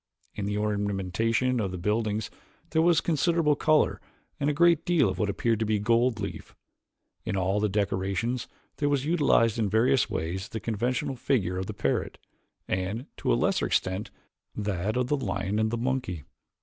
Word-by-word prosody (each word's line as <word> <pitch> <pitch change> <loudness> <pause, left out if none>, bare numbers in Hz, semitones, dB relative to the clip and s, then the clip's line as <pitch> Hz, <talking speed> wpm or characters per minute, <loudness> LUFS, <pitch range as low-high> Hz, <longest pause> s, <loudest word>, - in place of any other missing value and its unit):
In 100 -1 -4
the 105 0 -1
ornamentation 105 +4 0
of 100 -4 -1
the 90 - -5
buildings 105 +2 -1 0.4
there 160 - +3
was 170 0 +4
considerable 165 -1 +2
color 155 +1 +2 0.4
and 140 - +1
a - - +3
great 170 +1 +4
deal 170 -9 +3
of 95 0 -4
what 105 - +1
appeared 115 +2 0
to 110 - 0
be 110 -1 +2
gold 115 +2 +2
leaf. 100 -1 -6 0.7
In 100 - -2
all 95 +2 +1
the 105 0 +1
decorations 100 +4 -1 0.3
there 145 - +1
was 140 -1 0
utilized 140 -8 +3
in 105 -3 +1
various 120 +6 +3
ways 90 +4 -3
the 110 - -4
conventional 125 +7 -1
figure 100 -8 0
of 95 - -4
the - - -6
parrot, - - -1 0.5
and, 95 +7 -2
to - - 0
a - - +4
lesser - - +1
extent, 95 +3 -1 0.5
that 105 +1 -2
of 125 - +2
the 145 - +1
lion 100 -3 -2
and 110 0 +2
the 115 - -2
monkey. 125 - -2
110 Hz, 175 wpm, -27 LUFS, 100-130 Hz, 0.7 s, was